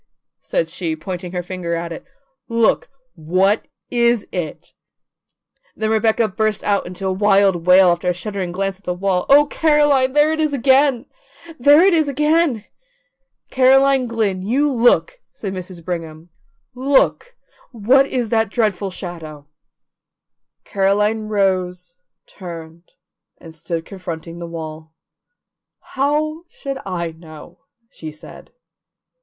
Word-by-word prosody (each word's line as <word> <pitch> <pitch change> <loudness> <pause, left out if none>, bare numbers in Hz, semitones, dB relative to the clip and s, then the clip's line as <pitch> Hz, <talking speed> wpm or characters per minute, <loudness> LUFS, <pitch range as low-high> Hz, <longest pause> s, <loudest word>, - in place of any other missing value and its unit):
said 165 - -2
she, 165 -1 -4
pointing 175 +2 -6
her 180 -1 -3
finger 175 -2 -4
at 170 0 -4
it. 165 - -7 0.4
"Look! 230 -1 +1 0.2
What 185 +5 0 0.2
is 235 -2 +2
it?" 175 -4 -6 1.0
Then 220 0 -1
Rebecca 220 +1 +2
burst 215 +1 -1
out 200 -3 0
in 180 - -8
a 190 - +1
wild 195 -3 +2
wail 185 0 +7
after 175 +1 0
a - - +1
shuddering 190 -2 -4
glance 195 +1 -3
at - - -30
the 180 - -3
wall: 185 -1 -1
"Oh, 290 +1 +7
Caroline, 295 -4 +2
there 295 +2 +4
it 315 - -3
is 305 -2 0
again! 265 -1 +3 0.5
There 290 +6 +6
it 390 - +4
is 315 -3 +2
again!" 300 -4 +1 0.9
"Caroline 265 0 +4
Glynn, 215 -5 -1
you 270 +9 +1
look!" 255 - +2
said 195 -3 -6
Mrs. 185 -2 -8
Brigham. 165 -2 -6 0.4
"Look! 275 - +1 0.4
What 255 +4 +3
is 245 -5 -2
that 225 -2 +1
dreadful 210 -3 -1
shadow?" 165 -5 -8 1.2
Caroline 210 +2 0
rose, 185 -3 -1 0.3
turned, 170 -2 -10 0.5
and 165 -2 -13
stood 165 +1 -5
confronting 170 -3 -8
the 170 - -6
wall. 160 -1 -8 1.0
"How 310 +4 0
should 275 -2 -6
I 170 -3 -3
know?" 160 - -14 0.3
she 160 -1 -8
said. 155 - -14
195 Hz, 130 wpm, -19 LUFS, 175-260 Hz, 1.2 s, wail